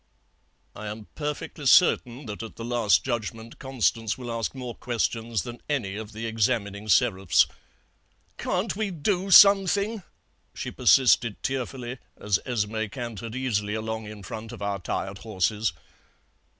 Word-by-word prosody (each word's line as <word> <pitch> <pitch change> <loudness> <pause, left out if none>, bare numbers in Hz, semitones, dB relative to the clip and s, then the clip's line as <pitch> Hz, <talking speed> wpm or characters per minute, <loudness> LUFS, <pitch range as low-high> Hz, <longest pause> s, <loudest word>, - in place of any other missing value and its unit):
"I 110 - -7
am 105 +1 -6
perfectly 150 -1 -4
certain 130 -4 +4
that 105 -1 -6
at 115 - -8
the 115 - -7
Last 110 -7 +3
Judgment 115 -1 -4
Constance 115 -4 0
will 125 -2 -6
ask 115 +2 -3
more 125 -2 -5
questions 115 -4 -2
than 120 0 -8
any 115 -10 -1
of 110 0 -7
the 110 +1 -6
examining 110 -2 -1
Seraphs. 95 -3 +4 0.9
"'Can't 185 +4 -1
we 215 0 -1
do 185 +3 -1
something?' 200 +3 +6 0.5
she - - -4
persisted 120 -4 +4
tearfully, 130 -1 -3 0.2
as 105 -2 +1
Esmé 110 -3 -1
cantered 115 -3 -6
easily 105 -5 -1
along 110 0 -4
in 105 -1 -9
front 110 +4 -7
of - - -9
our 100 -1 -1
tired 95 +2 -4
horses. 105 0 0
115 Hz, 135 wpm, -26 LUFS, 105-130 Hz, 0.9 s, something